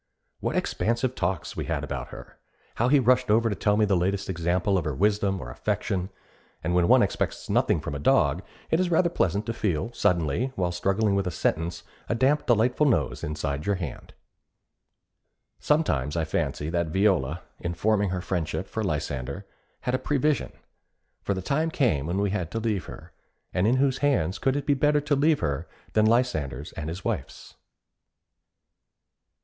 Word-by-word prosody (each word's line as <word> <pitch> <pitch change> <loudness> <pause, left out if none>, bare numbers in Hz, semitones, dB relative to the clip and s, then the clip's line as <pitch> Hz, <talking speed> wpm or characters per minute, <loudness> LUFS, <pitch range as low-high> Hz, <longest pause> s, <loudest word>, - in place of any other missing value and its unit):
What - - -2
expansive 120 +3 0
talks 85 - -2
we - - -3
had - - -2
about - - -4
her! - - -12 0.4
How 120 - +2
he 145 +3 +5
rushed 125 -1 +3
over 115 +2 +4
to - - -1
tell 105 +1 +1
me 110 - +4
the 100 -1 +2
latest 95 +2 0
example 90 +3 0
of 90 - 0
her 75 -3 -2
wisdom 100 +1 +1
or - - -7
affection; 90 +8 -2 0.5
and 85 +2 0
when 90 -1 +3
one - - +6
expects - - -2
nothing - - +2
from - - -5
a 70 - -4
dog, 75 - +3 0.3
it 160 - +3
is 185 -1 +1
rather 170 0 +3
pleasant 100 - 0
to 115 - -2
feel 105 +1 -1
suddenly, 90 - +1
while 90 -2 0
struggling 95 +4 +1
with 100 -1 0
a - - +1
sentence, 85 0 -1 0.3
a 115 - +1
damp 140 +5 +2
delightful 125 +5 +3
nose 70 - 0
inside 75 0 -3
your 100 - +2
hand. 80 -8 -7 1.4
Sometimes 80 - +1
I 80 - +1
fancy 80 0 -2
that 85 -1 0
Viola, 90 -4 +1 0.2
in 85 -1 -3
forming 100 +2 +2
her 90 0 -2
friendship 90 0 -2
for 110 - -3
Lysander, 75 -1 -3 0.4
had 125 - -2
a 130 - +1
prevision; 145 +2 0 0.7
for 100 - -1
the 95 - -4
time 155 - 0
came 110 - +1
when 90 +3 -1
we 100 -1 +1
had 95 -6 -2
to 115 - -1
leave 110 -6 -1
her, - - -11 0.4
and 95 +3 +2
in 120 - +4
whose 135 0 +2
hands 100 - +1
could 135 0 +1
it 145 - -2
be 145 - +3
better 145 +1 +2
to 145 0 +1
leave 150 +2 +3
her 70 -1 -2 0.3
than 110 0 +4
Lysander's 80 - 0
and 75 - -5
his 90 +4 -7
wife's? - - -4
100 Hz, 180 wpm, -26 LUFS, 85-125 Hz, 1.4 s, one